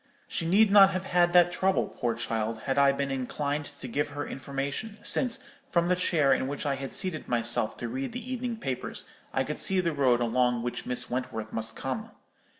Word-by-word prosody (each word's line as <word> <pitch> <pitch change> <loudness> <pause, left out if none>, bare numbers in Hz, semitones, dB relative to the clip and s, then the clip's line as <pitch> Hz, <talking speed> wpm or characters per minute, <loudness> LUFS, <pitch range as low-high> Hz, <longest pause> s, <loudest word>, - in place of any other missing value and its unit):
She 165 - -2
need 200 +4 +5
not 200 -1 +8
have 185 0 -2
had 175 -1 +3
that 175 -1 +6
trouble, 190 +1 +1
poor 120 -2 -2
child, 110 -1 -2
had 135 +3 0
I 140 0 +6
been 140 0 -2
inclined 140 +3 -2
to 145 -3 -9
give 145 +5 -1
her 145 0 -4
information; 140 - -4
since, 255 0 +2 0.3
from 170 -4 +2
the 180 - +4
chair 155 -6 +3
in 130 - 0
which 145 +2 -4
I 140 - +1
had 135 0 -5
seated 185 -5 -1
myself 120 -2 0
to 120 - -4
read 130 +3 -4
the 250 +2 -5
evening 245 -2 -3
papers, 130 - -4 0.3
I 135 - +1
could 150 +3 -3
see 190 -1 +2
the 170 -3 0
road 130 -4 +3
along 120 0 +1
which 120 - -4
Miss 125 0 0
Wentworth 110 -3 -4
must 115 0 -3
come. 220 +12 -4
140 Hz, 205 wpm, -28 LUFS, 125-180 Hz, 0.3 s, not